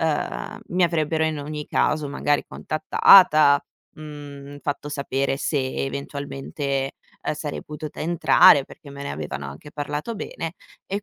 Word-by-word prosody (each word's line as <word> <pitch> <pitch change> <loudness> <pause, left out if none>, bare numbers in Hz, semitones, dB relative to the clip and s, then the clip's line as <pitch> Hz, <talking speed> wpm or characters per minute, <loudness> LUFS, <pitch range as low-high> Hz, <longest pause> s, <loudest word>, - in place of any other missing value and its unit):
ehm, 160 -2 -2
mi 180 +1 +1
avrebbero 160 -1 +1
in 155 -1 -1
ogni 150 +1 -5
caso 155 -2 +1
magari 145 0 0
contattata, 155 -2 +5 0.3
mhmm, 145 -2 -9
fatto 145 0 -3
sapere 140 -1 -1
se 145 +1 -1 0.3
eventualmente, 140 0 -4 0.3
ehm, - - -1
sarei 150 -1 -5
potuta 150 0 -8
entrare 170 -2 +6
perché 145 -4 -14
me 140 0 -8
ne 140 - -4
avevano 70 -2 -5
anche 75 - -11
parlato 150 +9 -4
bene 165 -4 -5 0.3
e 200 +1 -3
145 Hz, 135 wpm, -23 LUFS, 140-155 Hz, 0.3 s, entrare